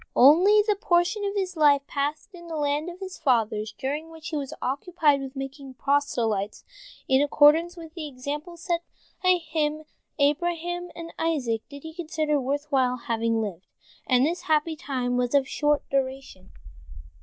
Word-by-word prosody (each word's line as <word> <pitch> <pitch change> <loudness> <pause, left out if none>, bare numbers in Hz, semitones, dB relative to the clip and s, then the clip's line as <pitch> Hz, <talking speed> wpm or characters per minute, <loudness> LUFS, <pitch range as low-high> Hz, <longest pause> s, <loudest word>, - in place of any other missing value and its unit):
Only 365 +11 +7
the 420 -2 +2
portion 360 +1 +1
of 400 0 -2
his 375 -2 -2
life 290 -3 +4
passed 295 +8 -3
in 345 -1 -11
the 330 - -5
land 295 +2 0
of 355 +1 -10
his 375 -1 -7
fathers, 220 -5 +1
during 295 +4 -3
which 320 -1 -9
he 320 - -4
was 280 -3 -3
occupied 285 +1 +1
with 270 0 -7
making 270 0 -7
proselytes, 235 -8 0 0.4
in 265 +1 +4
accordance 305 +4 +4
with 325 -2 -10
the 330 -3 -5
example 295 +6 -6
set 345 0 -1 0.4
him 320 -5 +1
by 310 - -13 0.3
Abraham 345 +4 0
and 335 0 -8
Isaac, 265 -9 0
did 285 -1 -10
he 320 0 -8
consider 310 -3 -1
worth 285 +3 -2
while 255 -2 +2
having 230 -1 -1
lived, 190 -4 -6 0.4
and 255 0 +4
this 340 +3 -1
happy 315 +1 +1
time 250 -4 -2
was 250 +2 0
of 275 -1 +3
short 295 0 0
duration. 265 -8 -3
295 Hz, 165 wpm, -26 LUFS, 265-335 Hz, 0.4 s, Only